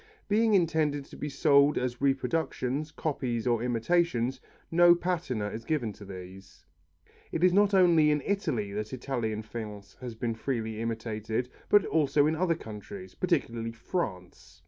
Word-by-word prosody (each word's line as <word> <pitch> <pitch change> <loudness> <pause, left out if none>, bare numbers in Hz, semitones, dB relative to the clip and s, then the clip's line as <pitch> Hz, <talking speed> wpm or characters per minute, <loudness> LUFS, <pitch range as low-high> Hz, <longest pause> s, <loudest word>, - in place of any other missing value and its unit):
Being 220 +1 +3
intended 155 -5 +1
to - - -13
be 150 - -4
sold 140 +1 +4
as 125 0 -2
reproductions, 140 0 0
copies 125 -8 -2
or 120 -2 +2
imitations, 125 +1 0 0.3
no 175 +1 +7
patina 165 - -2
is 110 +2 -7
given 120 -7 -1
to 100 - -12
these. 95 0 -11 0.7
It 165 - -2
is 180 -1 +5
not 200 +1 +4
only 170 -5 +5
in 150 -2 +1
Italy 155 - -1
that 105 +4 -4
Italian 120 -4 -3
faience 105 -2 -8
has 125 -3 -6
been 115 +1 -2
freely 110 -2 -3
imitated 115 +1 -3 0.2
but 205 -2 +5
also 145 -2 +2
in 155 +1 +1
other 170 0 +1
countries, 165 - -9
particularly 120 -10 -1
France. 90 - -5
130 Hz, 145 wpm, -29 LUFS, 110-165 Hz, 0.7 s, no